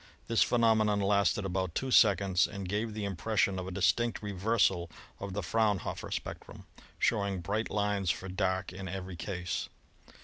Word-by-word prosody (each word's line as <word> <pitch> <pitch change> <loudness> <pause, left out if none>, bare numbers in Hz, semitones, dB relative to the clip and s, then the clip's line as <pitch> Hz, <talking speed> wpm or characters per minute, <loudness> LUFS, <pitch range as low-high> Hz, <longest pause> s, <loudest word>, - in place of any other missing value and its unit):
This 115 -1 +1
phenomenon 110 -3 +3
lasted 100 -1 +2
for - - -5
about 95 -3 -2
two 130 -1 -2
seconds 95 -5 +4
and 100 -3 -6
gave 105 +3 -2
the 105 -2 -3
impression 100 0 0
of 90 - -5
a - - -5
distinct 105 +6 +1
reversal 100 -3 +1 0.3
of 100 -1 -5
the 100 0 -3
Fraun 105 +3 +2
hofer - - -5
spectrum, - - -6 0.3
showing 100 -2 +1
bright 105 +6 -2
lines 100 -2 0
for 95 - -1
dark 95 0 -1
in 95 +1 -6
every 95 0 -5
case. 90 0 -4
100 Hz, 165 wpm, -31 LUFS, 95-105 Hz, 0.3 s, seconds